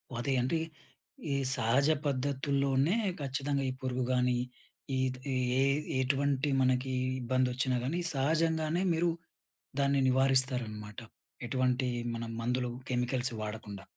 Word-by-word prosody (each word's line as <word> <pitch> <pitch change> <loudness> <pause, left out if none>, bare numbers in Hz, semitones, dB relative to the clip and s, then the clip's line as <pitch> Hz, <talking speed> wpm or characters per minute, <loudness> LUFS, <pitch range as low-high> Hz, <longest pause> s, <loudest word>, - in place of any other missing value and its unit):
అదే 125 +3 -1
అంటే, 160 +7 0 0.7
ఈ - - +1 0.2
సహజ 125 +6 +2 0.2
పద్ధతుల్లోనే 140 - +1 0.3
ఖచ్చితంగా 140 +1 -1
ఈ - - -1
పురుగు 130 -1 -1
గానీ, 125 -1 +2 0.6
ఈటిది 130 +1 -2 0.3
ఎ - - +4 0.4
ఎటువంటి 140 +1 +1
మనకీ 130 0 +1 0.3
ఇబ్బందొచ్చినా 130 +1 +1
గానీ, 165 +6 -1
సహజంగానే 160 +4 +1
మీరు 170 +1 +2 0.7
దాన్ని 140 0 +2
నివారిస్తారనమాట. 125 -5 +2 0.5
ఎటువంటి 130 0 +1 0.3
మనం 115 0 -5
మందులు, 125 +1 -1 0.2
కెమికల్సు 125 0 0
వాడకుండా. 105 -2 -6
130 Hz, 105 wpm, -31 LUFS, 125-140 Hz, 0.7 s, ఎ